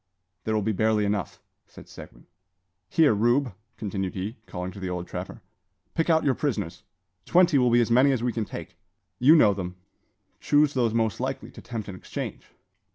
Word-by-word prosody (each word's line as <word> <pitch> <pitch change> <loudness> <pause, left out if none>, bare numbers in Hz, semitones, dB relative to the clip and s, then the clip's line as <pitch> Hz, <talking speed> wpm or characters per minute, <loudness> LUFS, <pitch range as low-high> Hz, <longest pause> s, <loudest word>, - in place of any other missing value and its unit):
"There 110 - 0
will 105 - +1
be 110 - +1
barely 110 +1 +2
enough," 100 -1 -2 0.3
said - - -14
Seguin. - - -13 0.6
"Here, 155 -7 +4
Rube," 120 +4 +2 0.2
continued 95 -3 -3
he, 100 +5 -4
calling 90 +1 -5
to 100 - -11
the 95 -1 -4
old 90 -1 -4
trapper; - - -7 0.5
"pick 165 +1 0
out 160 -1 +4
your 140 - +3
prisoners. 100 - -3 0.5
Twenty 175 -5 +5
will 125 -1 +3
be 120 +1 +4
as 120 - 0
many 130 +4 +5
as 125 -3 -1
we 120 -1 0
can 115 - -1
take. - - -9 0.4
You 145 +6 +7
know 105 -10 +6
them: 90 -2 -5 0.6
chose 145 0 +3
those 120 -3 +1
most 115 -2 0
likely 130 +2 -4
to - - -12
tempt 115 -3 -6
an 100 - -6
exchange." 95 - -6
115 Hz, 185 wpm, -26 LUFS, 100-135 Hz, 0.6 s, You